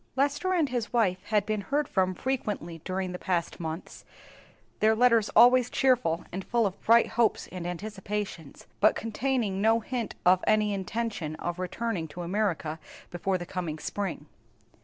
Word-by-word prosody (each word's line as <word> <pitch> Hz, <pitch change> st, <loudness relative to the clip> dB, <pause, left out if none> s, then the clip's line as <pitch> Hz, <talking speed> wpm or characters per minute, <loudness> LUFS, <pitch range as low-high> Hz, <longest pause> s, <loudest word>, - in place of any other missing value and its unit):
Lester 285 Hz, +7 st, +1 dB
and 330 Hz, -6 st, +2 dB
his 240 Hz, -3 st, -2 dB
wife 200 Hz, -7 st, +2 dB
had 210 Hz, -2 st, +1 dB
been 215 Hz, -1 st, -1 dB
heard 285 Hz, +8 st, -1 dB
from 185 Hz, -1 st, +1 dB
frequently 205 Hz, -, -3 dB
during 185 Hz, 0 st, -2 dB
the 180 Hz, -, -6 dB
past 180 Hz, -4 st, -2 dB
months, 160 Hz, +1 st, -6 dB, 0.8 s
their 220 Hz, +1 st, +4 dB
letters 230 Hz, -2 st, +4 dB
always 245 Hz, +1 st, +7 dB
cheerful 250 Hz, -11 st, +2 dB
and 190 Hz, +2 st, -4 dB
full 235 Hz, +1 st, +1 dB
of 195 Hz, -2 st, -3 dB
bright 230 Hz, +1 st, +5 dB
hopes 235 Hz, -1 st, +1 dB
and 180 Hz, -2 st, -5 dB
anticipations, 195 Hz, -3 st, -5 dB
but 215 Hz, -, +5 dB
containing 225 Hz, -3 st, -1 dB
no 225 Hz, +2 st, +4 dB
hint 235 Hz, -1 st, -4 dB
of 185 Hz, +1 st, +5 dB
any 215 Hz, -1 st, +3 dB
intention 195 Hz, -5 st, -3 dB
of 175 Hz, +2 st, -4 dB
returning 185 Hz, -1 st, -2 dB
to 175 Hz, +4 st, -7 dB
America 170 Hz, -4 st, -1 dB, 0.3 s
before 185 Hz, +2 st, -1 dB
the 175 Hz, -, -6 dB
coming 170 Hz, -4 st, -4 dB
spring. 195 Hz, +3 st, -4 dB
205 Hz, 160 wpm, -28 LUFS, 180-235 Hz, 0.8 s, always